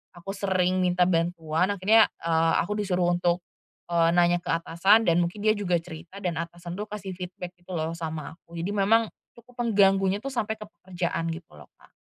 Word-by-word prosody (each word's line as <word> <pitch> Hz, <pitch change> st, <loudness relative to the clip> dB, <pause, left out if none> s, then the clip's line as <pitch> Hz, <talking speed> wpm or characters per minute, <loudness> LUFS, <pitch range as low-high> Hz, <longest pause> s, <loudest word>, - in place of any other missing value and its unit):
aku 175 Hz, +3 st, -7 dB
sering 185 Hz, -2 st, 0 dB
minta 180 Hz, 0 st, +2 dB
bantuan, 170 Hz, -1 st, +1 dB
akhirnya, 215 Hz, +4 st, +5 dB, 0.2 s
eee, 165 Hz, 0 st, +2 dB
aku 210 Hz, +4 st, -3 dB
disuruh 180 Hz, -3 st, +1 dB
untuk, 175 Hz, 0 st, 0 dB, 0.5 s
eee, 170 Hz, 0 st, +3 dB
nanya 175 Hz, 0 st, +4 dB
ke -, -, -15 dB
atasan 170 Hz, +6 st, +3 dB
dan 170 Hz, -4 st, +3 dB
mungkin 175 Hz, +4 st, -2 dB
dia 215 Hz, -, +5 dB
juga 205 Hz, -4 st, 0 dB
cerita 170 Hz, +4 st, -10 dB
dan 170 Hz, -3 st, -1 dB
atasan 175 Hz, +2 st, -6 dB
tuh 210 Hz, -, -4 dB
kasih 205 Hz, -2 st, -6 dB
feedback 180 Hz, -1 st, -7 dB
gitu 175 Hz, +1 st, -8 dB
loh 160 Hz, 0 st, -2 dB
sama 160 Hz, -1 st, -6 dB
aku. 170 Hz, -, -16 dB
Jadi 170 Hz, +4 st, -3 dB
memang 210 Hz, +2 st, +2 dB, 0.2 s
cukup 240 Hz, 0 st, -6 dB
mengganggunya 195 Hz, -1 st, +3 dB
tuh 275 Hz, -, -4 dB
sampai 220 Hz, -4 st, -2 dB
ke 215 Hz, -, -9 dB, 0.2 s
pekerjaan 175 Hz, -2 st, -3 dB
gitu 165 Hz, 0 st, -6 dB
loh 75 Hz, -, -14 dB
Kak. -, -, -23 dB
180 Hz, 190 wpm, -26 LUFS, 170-200 Hz, 0.5 s, akhirnya